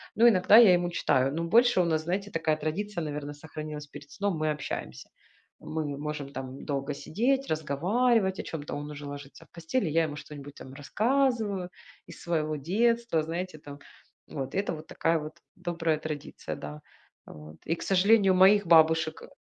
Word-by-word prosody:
Но 235 +2 +6
иногда 205 0 +6
я 215 -6 +8
ему 175 0 +1
читаю, 135 -5 +1
но 165 - -2
больше 235 +1 +4
у - - +1
нас, 160 -2 0
знаете, 195 +4 -3
такая 155 -2 0
традиция, 170 +4 -3
наверно, 145 -1 -5
сохранилась 150 0 -8
перед 145 0 -12
сном 200 +1 -2
мы 155 0 0
общаемся. 65 - -6 0.5
Мы 155 -3 -4
можем 145 -1 -5
там 130 0 -7
долго 140 0 -2
сидеть, 255 - -1
разговаривать 190 - +1
о - - -3
чем-то, 150 -3 -6
он 145 +1 -6
уже 145 0 -8
ложится 145 0 -10
в - - -33
постель 170 +8 -2
и, - - -2
я 165 +2 +3
ему 150 -2 -4
что-нибудь 145 -2 -10
там 130 - -11
рассказываю 215 - 0 0.4
из - - -12
своего 155 -3 -1
детства 225 - +1
знаете 170 0 -5
там. 145 -1 -11 0.5
Вот 135 -3 -5
и - - 0
это 200 - -2
вот 155 0 -9
такая 165 0 0
вот 155 +1 -8 0.2
добрая 170 -3 -1
традиция, 155 -2 -6
да, 75 0 -8 0.4
а, - - -12
вот. 75 +1 -12
И 165 - 0
к - - -12
сожалению, 195 +1 +4
моих 195 +1 +5
бабушек, 160 -1 +4
э, - - -11
160 Hz, 180 wpm, -28 LUFS, 145-190 Hz, 0.5 s, я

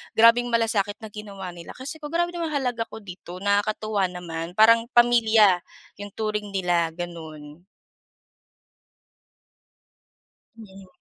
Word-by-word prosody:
grabeng 230 +2 +6
malasakit 225 -4 0
na 215 - -8
ginawa 200 -3 -8
nila. 170 -1 -11
Kasi 280 +5 -7
grabe 335 +3 -1
naman 340 -1 -3
yung 310 - -4
halaga 245 -4 -1
ko 220 - -11
dito. 180 -1 -10
Nakakatuwa 205 0 +1
naman. 175 -1 -6
Parang 230 +2 +5
pamilya 225 -5 +5 0.4
yung 205 -1 -8
turing 210 -2 -3
nila 175 -3 +1
ganun. 160 -2 -9 2.9
Mm. 195 -3 -13
205 Hz, 115 wpm, -24 LUFS, 180-230 Hz, 2.9 s, grabeng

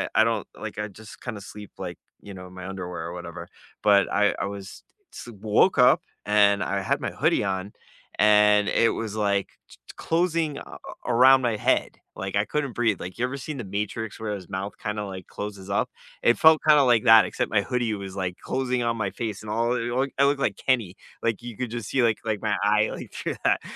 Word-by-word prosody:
I 110 - +6
don't 115 -3 -1
like - - -6
I 105 - -2
just 105 +2 -13
kind 120 -4 -5
of 100 - -10
sleep 105 +1 -10
like, - - -6 0.2
you 100 - -10
know, 90 -1 -9
in 90 - -15
my 95 0 -8
underwear 90 -3 -5
or 85 - -6
whatever 85 0 -8 0.4
but 100 -2 +4
I 105 0 +3
I - - -1
was 100 -1 -8 0.3
s - - -9
woke 105 -1 +3
up - - +6 0.2
and 105 -1 +4
I 100 0 -1
had - - 0
my - - -2
hoodie - - +1
on 95 +1 -3 0.5
and 105 -1 +5
it 115 - +3
was, 110 -2 -4
like, 100 -2 +1 0.2
t - - -16
t - - -11
closing 165 -3 0
a - - -7
a - - -10 0.4
around 130 +2 +7
my 120 -3 0
head. - - 0 0.2
Like, 95 +1 -5
I 100 - +3
couldn't 140 0 -2
breathe. 115 -5 +1
Like, 90 +4 -7
you 120 - -2
ever 135 +2 -4
seen 140 +1 -6
The 120 - -4
Matrix 105 +3 -4
where 105 -2 -3
his 90 -4 -10
mouth 95 +2 -4
kinda, 105 0 -3
like, 95 -2 -7
closes 100 -2 -7
up? 100 - 0 0.3
It 120 - +4
felt 160 -1 +6
kinda 150 -2 +7
like 120 -2 +3
that, 110 -1 +8
except - - -2
my 105 - +3
hoodie 120 -4 -1
was, 95 -1 -7
like, 90 -2 -3
closing 125 -2 -2
on 115 0 0
my 105 -3 -1
face 110 -4 -5
and 105 - -9
all, 115 +2 +1
I 120 +2 0
i - - -2
I 140 - +6
looked 140 0 +1
like - - 0
Kenny. 115 -8 0 0.3
Like, 115 -1 0
you 120 -3 -8
could 125 -3 -4
just 120 -3 -5
see, 130 -3 +2
like 115 -2 +2
like, 110 -2 -1
my 105 -2 0
eye, 105 +1 +3
like, - - -8
through - - -4
that. - - +3
105 Hz, 230 wpm, -25 LUFS, 100-120 Hz, 0.5 s, that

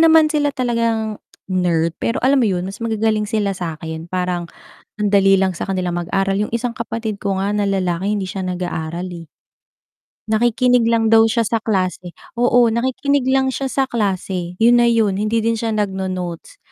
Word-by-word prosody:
naman 320 -1 +6
sila 295 -1 +2
talagang 230 -4 -1 0.3
nerd 170 -3 0
pero 230 - 0
alam 270 -1 +4
mo - - +3
'yun 180 -1 -2
mas 195 +4 -7
magagaling 220 -1 0
sila 210 -2 -1
sa'kin 160 -1 -6
parang 180 -2 -2 0.5
ang 210 - +2
dali 195 -1 +4
lang 190 -2 0
sa - - -3
kanilang 185 -2 -2
mag-aral. 195 +3 0
Yung 210 +2 -2
isang 235 0 -2
kapatid 225 -2 -4
ko 195 -2 -2
nga 200 - 0
na 205 -1 +1
lalaki 190 0 0
hindi 195 -3 -3
siya 190 0 -4
nag-aaral, 175 -1 -4
eh. 170 -2 -9 1.0
Nakikinig 240 +2 +3
lang 230 -1 +2
daw 225 0 +6
siya 230 0 +1
sa 225 +1 -1
klase, 185 -4 -1 0.2
oo, 245 0 +4
nakikinig 260 +5 0
lang 265 0 +3
siya 270 +2 -3
sa 270 +1 +1
klase 190 -6 -2
'yun 240 +1 +5
na 235 - +4
'yun 220 -4 +2
hindi 215 +3 0
din 230 +1 +1
siya 225 0 -2
nagno-notes 190 - -3
210 Hz, 175 wpm, -19 LUFS, 185-230 Hz, 1.0 s, naman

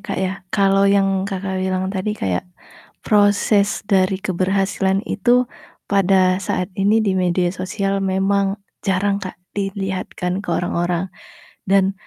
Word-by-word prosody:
Kak, - - -3
ya, 185 - -1 0.2
kalau 195 -1 +4
yang 195 -1 +2
Kakak 190 -1 -3
bilang 190 +1 -1
tadi 210 +2 -2
kayak 95 - -2 0.6
proses 205 0 +3
dari 190 -2 +2
keberhasilan 195 +2 0
itu 240 +4 +2 0.5
pada 190 -1 +3
saat 185 -1 -2
ini 215 +3 +3
di 195 - +1
media 180 -1 +1
sosial 195 +1 -2
memang 195 +1 +1 0.3
jarang 195 +1 +1
Kak, 185 - -7 0.2
dilihatkan 190 -2 -3
ke - - -12
orang-orang 175 +1 -1 0.6
dan 195 0 +3
195 Hz, 125 wpm, -20 LUFS, 185-200 Hz, 0.6 s, kalau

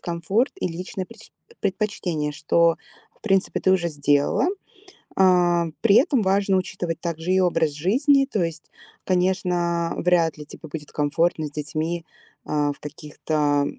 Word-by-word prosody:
комфорт 180 - 0
и - - 0
личные 180 +2 -5
преч - - -15 0.3
предпочтения, 185 -7 -2
что 165 +2 +2 0.4
в - - -31
принципе 195 -3 +1
ты 190 - +3
уже 175 -2 +1
сделала. 145 - +1 0.7
А, 175 -2 +4
при 215 -3 +4
этом 265 -2 +4
важно 195 0 +2
учитывать 175 -3 -3
также 170 +1 -2
и 190 - +4
образ 165 -3 +2
жизни. 270 - +3
То 210 -9 -1
есть, 165 -2 -4 0.4
конечно, 180 -2 0
вряд 170 -3 +2
ли 150 - -9
тебе 155 +1 -12
будет 150 -1 -7
комфортно 155 +2 0
с 145 - -9
детьми, 160 +3 -3 0.4
а, 145 -1 0
в 145 - -16
каких-то 150 -1 -1
170 Hz, 145 wpm, -23 LUFS, 155-190 Hz, 0.7 s, А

